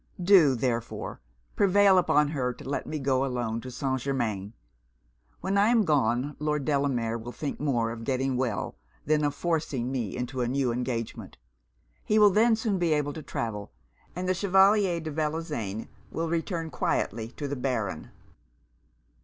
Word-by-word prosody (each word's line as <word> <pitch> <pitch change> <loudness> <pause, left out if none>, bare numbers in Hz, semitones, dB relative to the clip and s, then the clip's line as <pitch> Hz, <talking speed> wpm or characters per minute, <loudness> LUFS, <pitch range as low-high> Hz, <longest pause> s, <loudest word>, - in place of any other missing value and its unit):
Do, 175 -7 +6
therefore, 120 - -3 0.3
prevail 200 -1 +5
upon 150 -4 +3
her 130 -5 -1
to - - -11
let 140 - -3
me 155 - -3
go 135 -2 +1
alone 120 -4 -2
to 130 - -8
St. 130 +1 -2
Germains. 110 -7 -2 0.9
When 200 +1 +1
I 205 - +5
am 230 -2 +4
gone, 135 -1 +1
Lord 150 -2 -1
Delamere 130 -6 0
will 120 +2 -7
think 145 +3 -5
more 120 -6 0
of 115 0 -7
getting 130 +1 0
well 125 -5 -1 0.3
than 150 0 +2
of 145 -1 0
forcing 150 -8 -1
me 120 -7 -3
into 125 +1 -3
a 120 - +1
new 130 0 0
engagement. 120 -1 -4 0.7
He 215 - +1
will 210 -1 +7
then 225 +4 +4
soon 220 -4 -1
be 170 -3 +2
able 145 -1 0
to 160 - -7
travel; 105 -7 -4 0.4
and 180 +1 -3
the 185 - +3
Chevalier 195 -1 +4
de 160 -1 -5
Bellozane 150 - -3 0.2
will 165 0 -2
return 165 -1 -2
quietly 110 -3 -1
to 145 - -3
the 145 - -3
Baron.' 115 - -2
140 Hz, 160 wpm, -27 LUFS, 120-165 Hz, 0.9 s, will